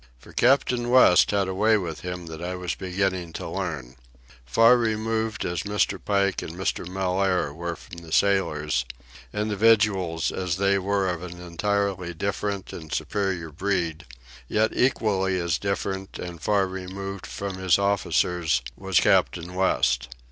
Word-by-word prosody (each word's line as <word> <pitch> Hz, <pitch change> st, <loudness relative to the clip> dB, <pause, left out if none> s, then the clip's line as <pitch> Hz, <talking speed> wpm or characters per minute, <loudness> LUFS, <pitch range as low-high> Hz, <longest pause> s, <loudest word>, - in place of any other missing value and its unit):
For -, -, -16 dB
Captain 125 Hz, -1 st, +2 dB
West 125 Hz, -8 st, +6 dB
had 100 Hz, -2 st, +1 dB
a 95 Hz, -, -2 dB
way 110 Hz, +3 st, +3 dB
with 85 Hz, -6 st, -4 dB
him 90 Hz, +1 st, -6 dB
that 80 Hz, 0 st, -8 dB
I 90 Hz, +1 st, -3 dB
was 90 Hz, -1 st, -3 dB
beginning 95 Hz, -2 st, -2 dB
to -, -, -5 dB
learn. 75 Hz, -8 st, -4 dB, 0.5 s
Far 115 Hz, -, +6 dB
removed 110 Hz, -1 st, -1 dB
as 85 Hz, -2 st, -2 dB
Mr. 105 Hz, 0 st, -1 dB
Pike 100 Hz, -2 st, +1 dB
and 80 Hz, -, -7 dB
Mr. 95 Hz, -1 st, -2 dB
Mellaire 95 Hz, -3 st, 0 dB
were 85 Hz, +2 st, -4 dB
from 85 Hz, -, -12 dB
the 85 Hz, -1 st, -11 dB
sailors, 75 Hz, -10 st, +2 dB, 0.5 s
individuals 105 Hz, -5 st, +2 dB
as 90 Hz, -2 st, -2 dB
they 100 Hz, 0 st, +2 dB
were 100 Hz, 0 st, 0 dB
of 90 Hz, -2 st, -2 dB
an 90 Hz, -1 st, -8 dB
entirely 90 Hz, 0 st, -2 dB
different 100 Hz, +2 st, -3 dB
and 80 Hz, -2 st, -9 dB
superior 95 Hz, -6 st, -2 dB
breed, 85 Hz, -2 st, -2 dB, 0.4 s
yet 110 Hz, +1 st, +2 dB
equally 95 Hz, -7 st, +1 dB
as 85 Hz, -1 st, 0 dB
different 100 Hz, -1 st, -3 dB
and 85 Hz, -2 st, -7 dB
far 100 Hz, +2 st, +2 dB
removed 95 Hz, +1 st, -6 dB
from 100 Hz, -2 st, -5 dB
his 95 Hz, -2 st, +4 dB
officers 90 Hz, -6 st, +1 dB
was 95 Hz, -2 st, +2 dB
Captain 90 Hz, +1 st, +2 dB
West. 65 Hz, -9 st, +1 dB
95 Hz, 150 wpm, -25 LUFS, 85-100 Hz, 0.5 s, West